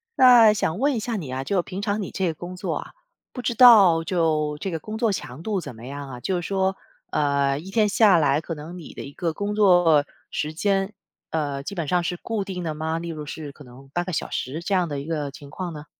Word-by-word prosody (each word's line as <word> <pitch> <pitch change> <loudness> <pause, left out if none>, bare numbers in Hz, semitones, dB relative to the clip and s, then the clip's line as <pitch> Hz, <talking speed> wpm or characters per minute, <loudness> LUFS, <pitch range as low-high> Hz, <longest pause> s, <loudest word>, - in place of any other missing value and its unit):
那 245 -4 +8
想 185 -4 -1
问 285 +1 +2
一 - - -1
下 230 +1 -3
你 150 -10 -5
啊， 130 +1 -3
就 190 +3 +1
平 185 +3 -6
常 205 0 -1
你 190 - -5
这 190 -2 -1
个 160 - -1
工 175 +3 -8
作 - - -3
啊， - - -6 0.4
不 250 - -6
知 240 -1 -1
道 200 -10 +8
就 155 -5 0
这 195 - -3
个 165 -2 -3
工 215 +6 -6
作 225 -2 +2
强 140 -5 -5
度 200 -1 -2
怎 135 -7 -8
么 115 +2 -11
样 140 0 -7
啊？ 125 -1 -8
就 180 +7 -1
是 - - -5
说， 190 -1 0 0.4
呃， 140 -2 +1
一 185 +6 -8
天 215 0 +3
下 205 -3 +5
来， 150 -1 +2
可 165 - -5
能 160 +4 -8
你 165 - -10
的 - - -8
一 140 - -10
个 170 -2 -2
工 205 +3 -3
作 175 -7 +5 0.2
时 155 +1 -3
间， 195 +3 0 0.4
呃， 145 -3 -2
基 200 - -6
本 170 -5 -3
上 175 +1 +1
是 175 0 -2
固 220 -1 -3
定 185 -2 -5
的 155 - -2
吗？ 160 +1 -2
例 170 - -6
如 155 -2 -6
是 145 -1 -7
可 145 - -14
能 130 +2 -15
8 175 - 0
个 185 - -5
小 155 - -2
时 140 +6 -3
这 195 +2 0
样 175 -3 +1
的 145 -1 -3
一 140 - -7
个 150 -4 -3
情 140 0 -12
况 180 +1 -5
呢？ 150 0 -9
170 Hz, 275 characters per minute, -24 LUFS, 150-195 Hz, 0.4 s, 那